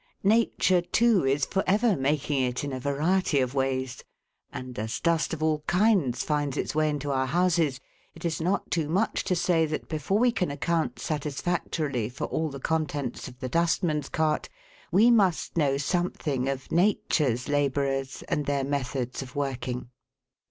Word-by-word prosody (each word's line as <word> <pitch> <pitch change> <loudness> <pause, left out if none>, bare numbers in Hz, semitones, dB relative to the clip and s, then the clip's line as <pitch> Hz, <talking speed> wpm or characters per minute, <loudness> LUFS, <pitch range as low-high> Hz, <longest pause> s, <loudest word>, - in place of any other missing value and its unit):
Nature, 200 -4 +3
too, 225 +3 +3
is 135 0 +2
for 195 - -1
ever 210 +2 +3
making 145 0 0
it 125 +1 -1
in 140 -2 -3
a 130 - -3
variety 150 +4 +1
of 130 -1 0
ways; 130 -2 -1 0.5
and 125 -3 -7
as 110 +1 -3
dust 170 -2 +1
of 160 -1 -3
all 155 -1 +2
kinds 180 - +2
finds 145 -2 -1
its - - -2
way 155 0 +2
into 145 -1 -2
our 130 -1 +1
houses, 165 -3 +2 0.4
it - - -9
is 165 -1 -1
not 180 +4 -1
too 160 -3 0
much 195 +7 +1
to 180 - 0
say 170 -1 +2
that, 155 - -4
before 155 +5 -1
we 245 +2 +4
can 185 -8 -1
account 160 +3 -1
satisfactorily 150 -4 -2
for 125 - -4
all 160 0 -1
the 140 -1 -7
contents 145 -4 -2
of 125 - -11
the 130 - -3
dustman's 165 -1 +1
cart, 155 -1 0 0.4
we 225 +6 +6
must 195 -7 +2
know 140 -4 +2
something 145 -4 -1
of 135 -1 -5
Nature's 155 - +1
labourers 140 -2 0
and 145 - -2
their 140 -1 +1
methods 130 -2 -2
of 130 -1 -9
working. 130 -3 -3
150 Hz, 165 wpm, -27 LUFS, 135-175 Hz, 0.5 s, we